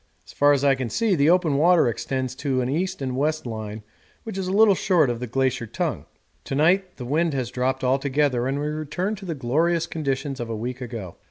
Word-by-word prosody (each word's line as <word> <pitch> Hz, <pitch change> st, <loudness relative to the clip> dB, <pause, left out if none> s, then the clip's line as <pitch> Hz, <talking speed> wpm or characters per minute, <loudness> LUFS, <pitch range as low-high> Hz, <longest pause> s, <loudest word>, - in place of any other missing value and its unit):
As -, -, -14 dB
far 145 Hz, 0 st, +4 dB
as 140 Hz, -1 st, +2 dB
I 140 Hz, -1 st, +5 dB
can 130 Hz, -3 st, -3 dB
see 225 Hz, -, +1 dB
the 150 Hz, -3 st, +3 dB
open 170 Hz, -5 st, +3 dB
water 170 Hz, 0 st, +5 dB
extends 130 Hz, +2 st, -2 dB
to 135 Hz, -3 st, 0 dB
an 125 Hz, -, -1 dB
east 180 Hz, +2 st, -2 dB
and 130 Hz, -1 st, -2 dB
west 155 Hz, +3 st, 0 dB
line 110 Hz, -2 st, -6 dB, 0.4 s
which 220 Hz, -, -6 dB
is 190 Hz, -1 st, -3 dB
a -, -, -2 dB
little 210 Hz, +1 st, +6 dB
short 175 Hz, -8 st, +2 dB
of 120 Hz, -, -4 dB
the 125 Hz, -, -4 dB
glacier 130 Hz, -1 st, 0 dB
tongue. -, -, -3 dB, 0.4 s
To 135 Hz, -, -3 dB
night 180 Hz, +6 st, +2 dB
the 125 Hz, -, -6 dB
wind 155 Hz, +3 st, 0 dB
has 125 Hz, -2 st, -2 dB
dropped 130 Hz, +1 st, -1 dB
altogether 135 Hz, -1 st, +1 dB
and 135 Hz, +1 st, -1 dB
we 145 Hz, -, -2 dB
return 155 Hz, +6 st, -2 dB
to 195 Hz, -, -10 dB
the 165 Hz, -, -2 dB
glorious 160 Hz, +6 st, +1 dB
conditions 140 Hz, -3 st, -3 dB
of 120 Hz, -1 st, -4 dB
a 115 Hz, -, -3 dB
week 125 Hz, +3 st, -5 dB
ago. 115 Hz, -8 st, -7 dB
140 Hz, 230 wpm, -24 LUFS, 125-165 Hz, 0.4 s, little